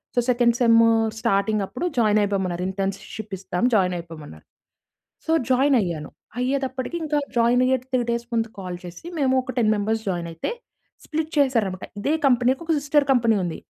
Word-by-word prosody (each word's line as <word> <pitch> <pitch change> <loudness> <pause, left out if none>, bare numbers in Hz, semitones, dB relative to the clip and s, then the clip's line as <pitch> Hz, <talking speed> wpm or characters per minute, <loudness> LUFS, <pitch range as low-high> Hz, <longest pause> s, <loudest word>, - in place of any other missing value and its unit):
So - - +3
second 240 -1 +3
sem 230 -2 +5 0.3
స్టార్టింగప్పుడు 215 - 0
జాయినైపోమన్నారు. 200 -5 +1
Internship 195 +2 -5
ఇస్తాం 180 0 -3
జాయినైపోమన్నారు. 170 - -3 0.8
So - - -1 0.2
జాయినైయ్యాను. 240 - +2 0.3
అయ్యేటప్పటికి 265 +2 -2
ఇంకా 300 -1 0 0.2
జాయినైయ్యే 245 +2 +3
3 255 -1 0
డేస్ 235 0 -1
ముందు 225 -1 0
కాల్ 180 -2 -5
చేసి 175 - -10
మేము 265 -2 +2
ఒక 255 0 -6
10 220 -3 +3
మెంబర్స్ 220 +2 -1
జాయినైతే 170 -2 -3 0.6
స్ప్లిట్ 315 0 -3
చేసారాన్నమాట. 230 -10 +1
ఇదే 280 +9 0
కంపెనీకి 250 +1 +3
ఒక 330 - -1
సిస్టర్ 285 0 +2
కంపెనీ 230 -4 +3
ఉంది. 170 -2 -4
230 Hz, 135 wpm, -23 LUFS, 190-255 Hz, 0.8 s, sem